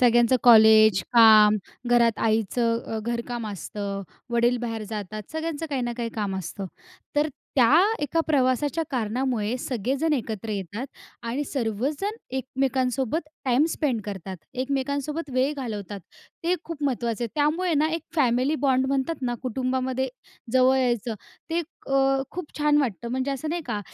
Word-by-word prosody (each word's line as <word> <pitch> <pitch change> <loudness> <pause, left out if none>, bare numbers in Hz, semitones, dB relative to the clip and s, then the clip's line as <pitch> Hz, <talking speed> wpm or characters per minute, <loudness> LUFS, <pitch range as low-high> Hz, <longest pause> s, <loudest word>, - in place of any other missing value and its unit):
सगळ्यांचं 240 0 +5
कॉलेज, 220 -4 +7
काम, 215 -2 +8 0.3
घरात 235 -2 +4
आईचं 230 +2 +1
अ, - - -1
घरकाम 235 0 -3
असतं, 200 +1 -5 0.3
वडील 240 +1 +3
बाहेर 225 -2 -3
जातात. 215 0 -5
सगळ्यांचं 320 0 -3
काही 265 -3 -1
ना 240 0 -2
काही 235 -1 -2
काम 200 -3 -2
असतं. 190 +2 -5 0.5
तर 295 +1 +3 0.3
त्या 270 +7 +6 0.2
एका 330 +3 +1
प्रवासाच्या 285 +2 +1
कारणामुळे 240 -1 -1
सगळेजण 265 +7 -1
एकत्र 225 -5 -3
येतात 205 +5 -4 0.4
आणि 255 +6 -2
सर्वजण 280 - -2 0.2
एकमेकांसोबत 260 +2 0 0.2
टाईम 260 +3 +3
स्पेंड 265 -8 0
करतात. 190 -2 -6 0.2
एकमेकांसोबत 280 +3 -2
वेळ 265 +3 +2
घालवतात. 210 -6 -5 0.4
ते 350 +2 +3
खूप 330 -3 -7
महत्त्वाचं 235 -3 -1
आहे. - - -3
त्यामुळे 315 +4 +1
ना 305 +2 +3
एक 330 - -3
फॅमिली 255 +1 +2
बॉन्ड 265 0 +3
म्हणतात 275 +3 -1
ना, 245 -1 0
कुटुंबामध्ये 260 +1 -1 0.4
जवळ 260 0 +5
यायचं, 240 -3 0 0.4
ते 335 +1 +1 0.3
अ, 270 0 +3
खूप 360 -4 -8
छान 295 0 +3
वाटतं, 235 -4 -1
म्हणजे 260 +2 -1
असं 275 +3 -3
नाही 340 0 -2
का, 215 -4 -2
255 Hz, 145 wpm, -25 LUFS, 225-280 Hz, 0.5 s, काम